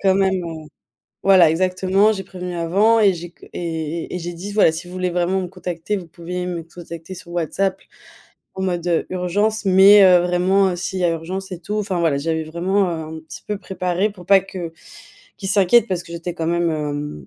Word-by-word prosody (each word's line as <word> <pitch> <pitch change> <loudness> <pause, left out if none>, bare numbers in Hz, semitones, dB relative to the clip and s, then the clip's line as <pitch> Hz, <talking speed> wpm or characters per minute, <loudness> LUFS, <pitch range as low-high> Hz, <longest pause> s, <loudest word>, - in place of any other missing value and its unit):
quand 190 -1 +3
même, 190 -2 +1
heu, 165 -1 -6 0.6
voilà, 185 -4 +6
exactement 185 +4 +2
j'ai 195 -2 -5
prévenu 180 -1 -7
avant 200 +7 +3
et 200 -3 +5
j'ai 175 0 -7
qu - - -18
et 165 -1 -4
et - - -8
et 180 - -2
j'ai 175 0 -5
dit: 180 +4 -7
«voilà 205 -6 +5
si 165 +3 -6
vous 180 - -10
voulez 185 -1 -1
vraiment 180 +2 0
me 180 - -3
contacter, 180 +1 -4
vous 175 - -10
pouvez 180 +2 -5
me 175 -2 -4
contacter 170 +1 -10
sur 175 -1 -11
WhatsApp 185 +3 -1 0.8
en 190 - -6
mode 175 -2 -2
heu, 170 -2 0
urgence, 205 +4 -1
mais 195 +2 +7
heu, 180 -1 +7
vraiment 180 +2 +2
s'il 185 +1 -4
y - - -1
a 175 - +4
urgence 180 +4 -4
et 180 - -4
tout» 210 +5 -3
enfin 195 -4 -2
voilà 155 -4 +1
j'avais 160 +1 -1
vraiment, 180 +5 0
heu, 160 -1 -5
un - - -7
petit 160 - -11
peu 210 - -2
préparé 185 +1 -1
pour 180 -3 -14
pas 195 -1 +7
que 185 -3 -7 0.7
qu'ils 195 - -4
s'inquiètent 205 +3 +4
parce 180 -2 -2
que 170 - -12
j'étais 170 +1 -5
quand 165 -2 -3
même 170 0 +1
hem, 145 - -4
180 Hz, 215 wpm, -20 LUFS, 170-190 Hz, 0.8 s, mais